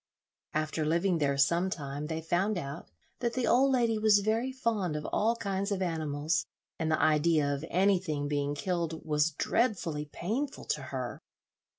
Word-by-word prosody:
After 155 +1 0
living 170 +3 +1
there 140 -2 +1
some 170 +7 +3
time 145 -3 -4
they 160 0 -3
found 180 +5 0
out 140 -4 -6 0.3
that 235 -1 -1
the 255 -2 0
old 265 +4 +4
lady 235 -4 +2
was 215 -1 +5
very 225 +5 0
fond 220 -10 -1
of 150 0 -4
all 225 +3 +2
kinds 200 -2 -2
of 200 - 0
animals, 155 -1 -1 0.3
and 160 -1 0
the 155 - +2
idea 155 -1 +3
of 140 +1 -4
anything 180 -6 +1
being 145 0 -1
killed 170 0 -2
was 150 0 +2
dreadfully 165 - 0
painful 250 +11 -3
to - - -1
her. - - -5
170 Hz, 165 wpm, -30 LUFS, 150-210 Hz, 0.3 s, was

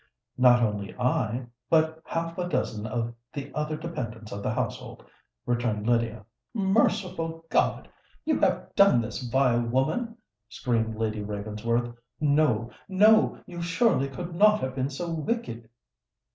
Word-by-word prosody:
"Not 125 -1 +6
only 105 -3 -2
I—but 125 +6 0
half 165 0 -3
a 175 0 -2
dozen 110 -9 -1
of 115 +1 -2 0.2
the 140 -2 -6
other 150 0 -2
dependants 120 -10 -6
of 100 - -5
the - - -1
household," - - -4 0.4
returned 120 -3 -1
Lydia. 115 -3 0 0.3
"Merciful 190 -5 0
God! - - +1 0.4
you - - +1
have - - 0
done 200 -11 +6
this, 110 0 -4
vile 125 -1 +2
woman?" 155 - -1 0.3
screamed 115 -3 -1
Lady 110 -1 -2
Ravensworth. 105 +3 -2 0.3
"No—no: 155 - +3
you 175 -1 -7
surely 170 - +2
could 175 +5 -6
not 210 +4 +5
have 130 0 -2
been 130 0 -1
so 165 +4 -4
wicked?" 155 - -3
130 Hz, 130 wpm, -27 LUFS, 115-165 Hz, 0.4 s, Not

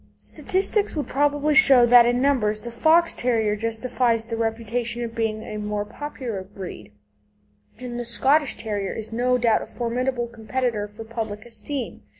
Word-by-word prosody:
Statistics 390 +1 -1
would 295 - -2
probably 290 +2 +1
show 265 -3 +7
that 240 0 +7
in 245 +1 +1
numbers 215 -7 +1
the 235 - -7
Fox 325 +8 +3
terrier 225 -4 0
justifies 230 +1 0
the 230 0 -4
reputation 230 +1 -2
of 230 -1 -5
being 220 -1 -2
a 215 - -6
more 210 0 -3
popular 250 -5 -6
breed, 185 - -9 0.9
and 245 0 -6
the 240 - -4
Scottish 275 +5 +2
Terrier 205 -3 -3
is 220 0 -5
no 250 +2 +2
doubt 230 -2 +2
a - - -7
formidable 245 +1 -2
competitor 235 -1 -3
for 210 +2 -10
public 220 -2 -5
esteem. 240 +2 -5
235 Hz, 155 wpm, -23 LUFS, 220-255 Hz, 0.9 s, show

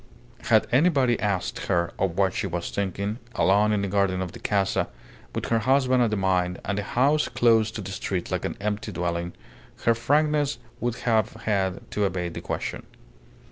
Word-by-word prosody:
Had - - +4
anybody 135 -4 +3
asked 100 -3 -2
her 85 0 +1
of 95 -2 0
what 95 -2 +2
she 105 - -2
was 85 -1 -4
thinking, 100 +3 -2 0.2
alone 105 +2 +4
in 105 -1 +1
the - - 0
garden 100 -1 +1
of 90 -2 -3
the - - -11
Casa, 100 -2 +1 0.5
with - - -3
her 115 - +3
husband 130 +1 +3
at 120 - +3
the 105 - 0
mine 90 -2 +1
and 100 0 -1
the - - -2
house 140 +8 +2
closed 115 -3 +3
to 110 - -3
the 95 0 -6
street 95 -1 -3
like - - -1
an - - -3
empty 105 +1 -2
dwelling, 85 0 -2 0.5
her 115 - +5
frankness 145 +4 +1 0.2
would 120 -1 -1
have 110 -2 +1
had 95 -3 0
to 105 - +1
evade 90 -2 -3
the - - -6
question. - - -4
105 Hz, 185 wpm, -25 LUFS, 95-120 Hz, 0.5 s, her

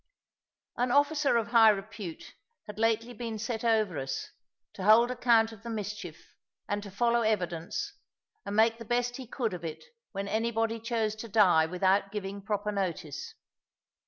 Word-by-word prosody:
An 245 +1 +1
officer 285 0 +3
of 230 0 -1
high 230 -2 +7
repute 195 -4 -4 0.3
had 210 0 -9
lately 230 +2 +1
been 230 -1 -5
set 220 +1 -3
over 215 -8 +2
us, 135 0 -4 0.4
to 190 - -7
hold 225 +4 +6
account 235 -3 +3
of 220 -3 -13
the 235 - -7
mischief, 205 -6 -6 0.3
and 205 0 -1
to 205 - -9
follow 235 +4 +2
evidence, 185 - -1 0.5
and 200 0 -4
make 225 +1 +4
the - - -6
best 245 +2 -1
he 260 -3 -8
could 230 -4 -2
of 175 - -6
it 160 -2 -6 0.3
when 195 -1 -4
anybody 225 +1 0
chose 225 -2 -1
to 230 - -7
die 180 -7 +5
without 190 +3 +1
giving 200 -1 -5
proper 210 +1 -2
notice. 175 -7 -4
220 Hz, 160 wpm, -29 LUFS, 195-235 Hz, 0.5 s, high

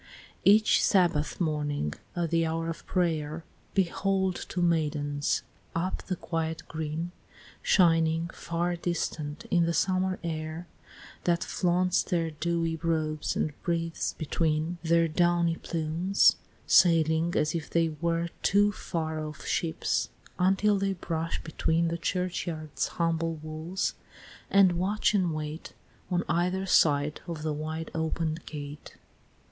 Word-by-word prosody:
II. 200 - +10
Each 215 0 +3
Sabbath 170 -6 +2
morning, 145 - -1 0.2
at 170 -2 -1
the 165 0 +3
hour 165 +1 -1
of 165 - -10
prayer, 160 -3 0 0.3
Behold 190 0 +1
two 175 - -1
maidens, 150 -3 0 0.3
up 180 +3 -1
the 185 - -3
quiet 165 -2 -3
green 160 +2 -4 0.5
Shining, 165 -2 +3
far 170 +1 -2
distant, 160 -3 -3
in 170 -1 +4
the 170 - 0
summer 185 0 +1
air 160 0 -4 0.6
That 170 -1 +2
flaunts 180 0 +1
their 165 -2 -1
dewy 165 +1 -1
robes 155 -2 -1
and 155 - 0
breathes 165 -1 -1
between 160 +2 -1
Their 165 0 +3
downy 170 0 +2
plumes, 170 +4 +2 0.3
sailing 165 -1 +4
as 150 - +1
if 165 -3 -4
they 165 -1 +2
were 165 +2 -1
Two 205 +1 +4
far 160 -5 -3
off 155 0 -7
ships, 165 -2 0 0.3
until 195 +3 +3
they 195 0 0
brush 165 -2 -3
between 165 +1 +1
The 170 +1 -3
churchyard's 170 -4 -2
humble 165 -1 0
walls, 155 +4 -3 0.6
and 195 -2 +6
watch 205 +4 +1
and 185 -5 +2
wait 155 +1 -5 0.4
On 175 -1 +1
either 180 +3 0
side 150 -4 +3
of 165 -3 -5
the 155 -1 -1
wide 155 +2 -4
open'd 160 0 -2
gate, 145 -1 -8
III. - - -27
165 Hz, 130 wpm, -28 LUFS, 155-175 Hz, 0.6 s, II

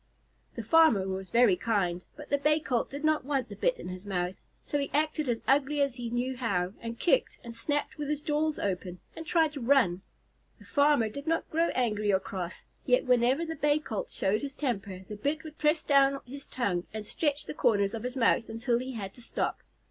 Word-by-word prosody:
The - - -4
farmer 315 - +5
was 190 0 -4
very 235 -5 +5
kind, 180 -4 0
but - - -11
the 285 - +3
Bay 300 +2 +3
Colt 250 -6 -1
did 285 +2 -7
not 310 -2 +2
want 270 -3 -1
the 205 - -7
bit - - +1
in - - -7
his 185 0 -7
mouth, 185 -2 -3 0.2
so 290 - -2
he 280 - -2
acted 305 -2 0
as 230 -1 0
ugly 285 +2 +2
as 275 -3 +1
he 240 -1 -4
knew 245 +2 -1
how, 195 -7 -1
and 230 0 -5
kicked, 455 - +2
and 235 -1 -8
snapped 290 +5 -2
with 295 -1 -3
his 300 -1 0
jaws 305 0 0
open, 180 -2 -3 0.2
and 325 - -8
tried 320 -3 +2
to 285 - -6
run. 230 -8 +3 0.6
The - - -17
farmer 285 -5 +3
did 280 +7 -8
not 330 0 0
grow 330 +2 +2
angry 215 -4 +1
or 190 - +3
cross, 185 -2 -6 0.2
yet 250 -1 +3
whenever 250 +5 +3
the 325 0 -4
Bay 295 0 +2
Colt 225 -9 -4
showed 200 +2 0
his 275 -1 -5
temper, 200 -9 -3
the 210 - -6
bit 290 +8 -1
would 315 -1 -11
press 305 +1 +2
down 275 -1 +4
his 275 +3 -9
tongue 190 -8 -1
and 215 -1 -6
stretch 290 +5 -1
the - - -5
corners 200 -8 +2
of 225 - -4
his 250 +3 -4
mouth 230 -1 +2
until 235 +2 0
he 260 +1 -5
had 195 -4 -5
to 245 - -15
stop. - - -2
250 Hz, 220 wpm, -29 LUFS, 205-295 Hz, 0.6 s, farmer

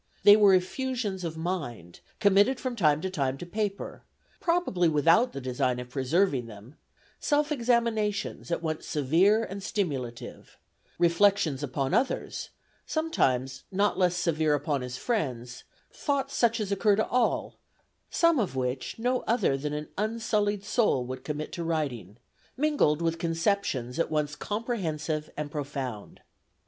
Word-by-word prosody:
They 205 +1 +10
were 205 -3 +6
effusions 205 0 -2
of 160 -1 -4
mind, 140 - -4 0.2
committed 205 +5 +4
from 255 -2 -3
time 155 -7 +3
to 190 - -2
time 135 -6 -1
to 175 - -7
paper, 200 +2 -3 0.4
probably 335 - +1
without 165 - +4
the 135 - -6
design 125 -1 -1
of 125 0 -8
preserving 135 -1 +1
them; 110 +4 -12 0.5
self 295 0 +1
examinations 230 -8 0
at 170 - -2
once 155 -1 -3
severe 175 - +3
and 200 -2 -6
stimulative; 140 - -4 0.4
reflections 175 -4 +3
upon 135 -1 -2
others, 260 +2 -1 0.4
sometimes, 135 - 0
not 200 +2 +2
less 180 -2 +2
severe 160 -3 +1
upon 145 -1 -1
his 125 0 -5
friends; 125 - -3 0.3
thoughts 275 -1 -1
such 230 -2 +2
as 205 -2 -3
occur 200 +1 +3
to 215 - 0
all, 245 -1 0 0.5
some 335 -4 +3
of 195 - -1
which 130 0 -3
no 250 +2 +1
other 225 - +2
than 145 +2 -3
an 150 0 -4
unsullied 210 -2 0
soul 210 - +2
would 130 +1 -6
commit 150 0 -4
to 170 - -4
writing, 135 - -3 0.4
mingled 270 - +2
with 165 0 0
conceptions 165 - -1
at - - +1
once 150 -1 -1
comprehensive 165 -10 -3
and 150 -1 -4
profound." 135 -7 -5
170 Hz, 140 wpm, -28 LUFS, 140-215 Hz, 0.5 s, They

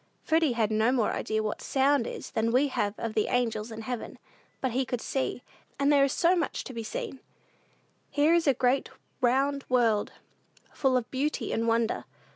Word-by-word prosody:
Freddy 320 -4 +2
had 225 -2 0
no 220 +3 +3
more 240 -5 +1
idea 220 0 -1
what 215 - -3
sound 275 -2 +2
is - - -7
than 225 +1 0
we 270 +4 +3
have 205 -5 -1
of 225 -1 -4
the 215 - +1
angels 230 -2 -1
in 225 0 -7
heaven; 245 0 -5 0.4
but 260 - -1
he 260 +3 +1
could 245 -1 -3
see, 260 0 -2 0.3
and 280 +1 +3
there 280 -1 +5
is 275 - +2
so 350 +5 +3
much 335 -4 -2
to 260 - -8
be 230 - -4
seen! 225 +4 -5 0.9
Here 300 +3 +3
is 340 -2 +2
a 275 - +4
great, 255 +2 +1 0.3
round 270 +3 +2
world, 230 -5 +2 0.6
full 265 -2 +2
of 245 -2 -4
beauty 275 -2 -1
and 230 +1 0
wonder. 230 0 +1
250 Hz, 190 wpm, -28 LUFS, 225-275 Hz, 0.9 s, there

